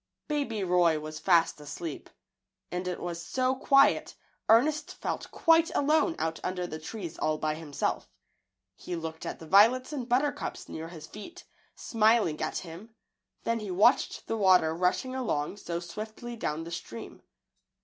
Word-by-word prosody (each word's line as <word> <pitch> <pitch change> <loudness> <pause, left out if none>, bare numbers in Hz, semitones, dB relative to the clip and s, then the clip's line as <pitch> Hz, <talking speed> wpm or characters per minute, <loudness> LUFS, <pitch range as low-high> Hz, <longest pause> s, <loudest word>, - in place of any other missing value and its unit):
Baby 275 -9 -1
Roy 175 -3 +3
was 155 0 -7
fast 170 -4 +3
asleep, 150 +2 -7 0.6
and 180 +1 -3
it 180 - -3
was 170 -1 -5
so 255 +8 0
quiet 275 +1 +4 0.3
Ernest 295 +7 +3
felt - - -4
quite 330 0 +4
alone 310 +3 +3
out 160 0 -2
under 180 -1 -2
the 155 -2 -6
trees 170 0 -7
all 155 0 +1
by 155 0 -1
himself. 155 -2 -3 0.7
He 180 - -6
looked 160 -1 -6
at - - -4
the 160 - -11
violets 235 - +5
and 255 -4 -4
buttercups 275 +4 -1
near 160 +1 -6
his 165 -2 -10
feet, 335 - -10 0.3
smiling 220 -8 +2
at 155 - -2
him; 185 +7 -9 0.5
then 230 0 0
he 210 -2 -6
watched 185 +3 +3
the 225 - -2
water 185 -6 +5
rushing 180 +9 0
along 205 - -2
so 170 -4 -4
swiftly 215 +7 -7
down 160 -7 -3
the 170 - -8
stream. 140 -9 -8
185 Hz, 155 wpm, -29 LUFS, 165-240 Hz, 0.7 s, violets